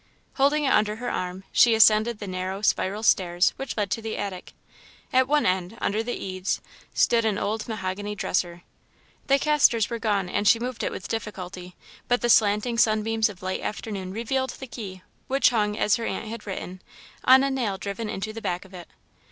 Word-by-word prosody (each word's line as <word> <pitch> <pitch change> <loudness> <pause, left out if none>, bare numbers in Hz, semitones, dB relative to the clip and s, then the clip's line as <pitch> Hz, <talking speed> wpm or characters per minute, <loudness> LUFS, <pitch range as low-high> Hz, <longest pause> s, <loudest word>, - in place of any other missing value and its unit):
Holding 290 +2 +2
it 270 - +2
under 210 0 +2
her 245 +2 -4
arm, 180 +1 -4
she 235 -2 +5
ascended 220 +1 +5
the 205 - -7
narrow, 185 +1 -4
spiral 205 +1 +1
stairs 180 -4 +3
which 270 -3 -5
led 205 -3 -1
to 225 - -1
the 220 0 -4
attic. 195 -3 -5 0.6
At 260 0 +4
one 295 +1 +2
end, 185 +3 0
under 215 +2 0
the 240 +2 -3
eaves, 185 0 -3 0.3
stood 230 -1 +3
an 215 -2 +1
old 215 +2 -2
mahogany 205 -1 -4
dresser. 175 -3 -2 0.6
The 275 0 +5
casters 275 -7 +3
were 235 - -2
gone 205 -4 0
and 205 +3 -1
she 230 - +7
moved 245 +1 -4
it - - -1
with - - -6
difficulty, 185 -4 -6 0.3
but 245 0 +2
the 240 - 0
slanting 215 +3 +3
sunbeams 220 0 +2
of 185 -3 -12
late 185 0 -2
afternoon 200 -3 -5
revealed 260 +5 -1
the 265 - -6
key, 195 -7 -8 0.2
which 270 0 +3
hung, 210 -3 0
as 210 - +2
her 230 - -4
aunt - - -3
had 220 -1 -8
written, 185 -1 -6 0.4
on 260 +1 +7
a 275 - +1
nail 235 -7 -1
driven 200 +2 -5
into 215 +2 -4
the 225 - -7
back 180 -2 -3
of 190 - -17
it. 175 -2 -9
215 Hz, 195 wpm, -25 LUFS, 190-235 Hz, 0.6 s, she